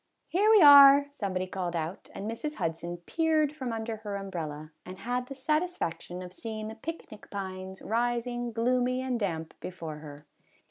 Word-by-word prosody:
" -, -, -50 dB
Here 415 Hz, +4 st, +4 dB
we 430 Hz, -5 st, +7 dB
are, 280 Hz, -1 st, +10 dB
" -, -, -31 dB
somebody 185 Hz, -2 st, -1 dB
called 180 Hz, -2 st, -4 dB
out, 165 Hz, +3 st, -4 dB
and 200 Hz, -, -5 dB
Mrs. 295 Hz, +7 st, -4 dB
Hudson 165 Hz, +1 st, -3 dB
peered 315 Hz, -2 st, +1 dB
from 260 Hz, -5 st, -4 dB
under 225 Hz, 0 st, -3 dB
her 210 Hz, -2 st, -5 dB
umbrella, 160 Hz, -6 st, -5 dB
and 185 Hz, +1 st, -9 dB
had 250 Hz, +4 st, -2 dB
the 275 Hz, -, -7 dB
satisfaction 265 Hz, -, -2 dB
of 180 Hz, 0 st, -10 dB
seeing 215 Hz, +1 st, -5 dB
the -, -, -6 dB
picnic 225 Hz, -3 st, -8 dB
pines 190 Hz, -1 st, -6 dB
rising 240 Hz, +1 st, -1 dB
gloomy 250 Hz, +2 st, +1 dB
and 255 Hz, -2 st, -1 dB
damp 165 Hz, -6 st, -3 dB
before 165 Hz, -4 st, -6 dB
her. 150 Hz, -1 st, -11 dB
220 Hz, 175 wpm, -29 LUFS, 180-255 Hz, -, are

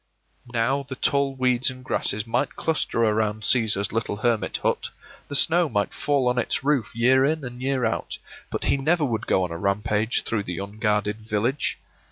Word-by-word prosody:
Now 120 Hz, +4 st, +1 dB
the 135 Hz, -1 st, -8 dB
tall 140 Hz, +1 st, +1 dB
weeds 125 Hz, -1 st, +2 dB
and 130 Hz, 0 st, -10 dB
grasses 105 Hz, -4 st, -1 dB
might 120 Hz, +4 st, -1 dB
cluster 155 Hz, -7 st, 0 dB
around 110 Hz, -1 st, 0 dB
Cæsar's 105 Hz, -3 st, +3 dB
little 115 Hz, -2 st, -2 dB
hermit 115 Hz, +1 st, 0 dB
hut, -, -, 0 dB, 0.4 s
the 145 Hz, -, -3 dB
snow 165 Hz, +3 st, +4 dB
might 105 Hz, -4 st, -1 dB
fall 140 Hz, -3 st, 0 dB
on 125 Hz, 0 st, +1 dB
its 125 Hz, -, 0 dB
roof 140 Hz, -6 st, +1 dB
year 130 Hz, +3 st, +4 dB
in 155 Hz, +2 st, 0 dB
and 125 Hz, 0 st, -8 dB
year 130 Hz, -2 st, 0 dB
out, 115 Hz, -, -2 dB, 0.3 s
but -, -, -4 dB
he -, -, +2 dB
never 155 Hz, +3 st, +1 dB
would 115 Hz, -4 st, -3 dB
go 95 Hz, -, +2 dB
on 90 Hz, -, -3 dB
a 85 Hz, -, -5 dB
rampage 105 Hz, +3 st, 0 dB
through 105 Hz, -3 st, -2 dB
the 90 Hz, -1 st, -5 dB
unguarded 105 Hz, +1 st, -1 dB
village. 110 Hz, +5 st, -1 dB
120 Hz, 185 wpm, -24 LUFS, 105-135 Hz, 0.4 s, snow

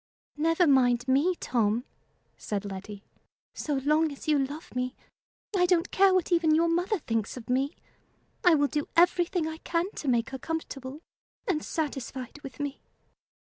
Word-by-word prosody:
"Never 330 Hz, +3 st, +3 dB
mind 250 Hz, -4 st, +3 dB
me, 285 Hz, +8 st, +3 dB
Tom," 230 Hz, -5 st, 0 dB, 0.5 s
said 205 Hz, -1 st, -4 dB
Letty. 200 Hz, +1 st, -7 dB, 0.5 s
"So 295 Hz, -, -2 dB
long 300 Hz, +3 st, +2 dB
as 280 Hz, -, -10 dB
you 300 Hz, -2 st, +4 dB
love 290 Hz, +4 st, -7 dB
me, 250 Hz, +1 st, -2 dB, 0.6 s
I 360 Hz, -1 st, +4 dB
don't 350 Hz, -1 st, +2 dB
care 390 Hz, 0 st, +5 dB
what 370 Hz, -1 st, +1 dB
even 330 Hz, -3 st, +4 dB
your 335 Hz, +1 st, +3 dB
mother 355 Hz, +6 st, +1 dB
thinks 225 Hz, -, -2 dB
of 245 Hz, 0 st, -6 dB
me. 270 Hz, +3 st, +1 dB, 0.7 s
I 355 Hz, -3 st, +6 dB
will 290 Hz, -1 st, +3 dB
do 295 Hz, 0 st, -2 dB
everything 350 Hz, 0 st, +3 dB
I 320 Hz, 0 st, -5 dB
can 340 Hz, +3 st, -1 dB
to 295 Hz, -, -5 dB
make 235 Hz, -2 st, +1 dB
her 265 Hz, -, -5 dB
comfortable, 290 Hz, -2 st, -5 dB, 0.5 s
and 315 Hz, -5 st, +1 dB
satisfied 270 Hz, -3 st, -4 dB
with 275 Hz, -1 st, -10 dB
me." 285 Hz, -1 st, -4 dB
295 Hz, 160 wpm, -28 LUFS, 255-335 Hz, 0.7 s, I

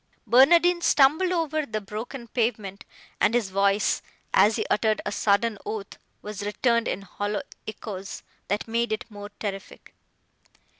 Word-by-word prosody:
Barnardine 340 Hz, +9 st, +5 dB
stumbled 310 Hz, +5 st, +4 dB
over 315 Hz, -3 st, 0 dB
the 220 Hz, -6 st, -3 dB
broken 225 Hz, +5 st, -7 dB
pavement, 215 Hz, -4 st, -2 dB, 0.3 s
and 215 Hz, +3 st, +3 dB
his 220 Hz, -6 st, 0 dB
voice, 200 Hz, +1 st, +2 dB, 0.3 s
as 215 Hz, +1 st, +5 dB
he -, -, -1 dB
uttered 215 Hz, 0 st, +1 dB
a 205 Hz, -, -2 dB
sudden 205 Hz, +1 st, +1 dB
oath, 210 Hz, -2 st, -6 dB, 0.2 s
was 210 Hz, -1 st, -6 dB
returned 235 Hz, +3 st, +1 dB
in 195 Hz, -, -3 dB
hollow 205 Hz, +2 st, -3 dB, 0.2 s
echoes, 200 Hz, -3 st, -7 dB, 0.2 s
that 205 Hz, +3 st, -2 dB
made 235 Hz, +1 st, 0 dB
it 215 Hz, -, -2 dB
more 205 Hz, 0 st, -8 dB
terrific. 195 Hz, -2 st, -7 dB
215 Hz, 140 wpm, -25 LUFS, 205-240 Hz, 0.3 s, Barnardine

